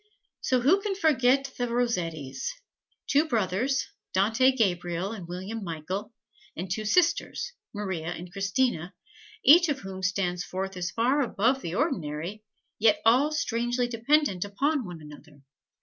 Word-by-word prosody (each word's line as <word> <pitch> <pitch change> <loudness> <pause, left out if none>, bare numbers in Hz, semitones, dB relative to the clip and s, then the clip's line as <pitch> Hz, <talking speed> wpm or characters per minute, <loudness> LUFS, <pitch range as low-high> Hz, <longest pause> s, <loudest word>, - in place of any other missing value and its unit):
So 255 -1 +1
who 345 +11 +4
can 400 -1 -2
forget 275 -6 +3
the 245 - 0
Rossettis 200 - -2 0.5
two 295 +3 +3
brothers, 230 +2 0 0.3
Dante 225 +7 +4
Gabriel 180 -5 0
and 195 -7 -7
William 190 +5 -5
Michael, 175 +5 -4 0.4
and 180 +2 -5
two 215 +3 -2
sisters, 345 - +1 0.2
Maria 190 -7 -4
and 175 0 -6
Christina 195 -2 -1 0.5
each 340 +2 +8
of 275 -2 -1
whom 190 -1 -7
stands 185 -1 0
forth 190 +1 -4
as 180 -1 -2
far 250 +9 +2
above 255 +1 +1
the 170 -4 -4
ordinary, 190 - -2 0.4
yet 215 -1 +4
all 260 +7 +5
strangely 245 -4 0
dependent 235 - +1
upon 270 +7 0
one 175 -3 -8
another? 150 -1 -14
215 Hz, 135 wpm, -27 LUFS, 180-260 Hz, 0.5 s, each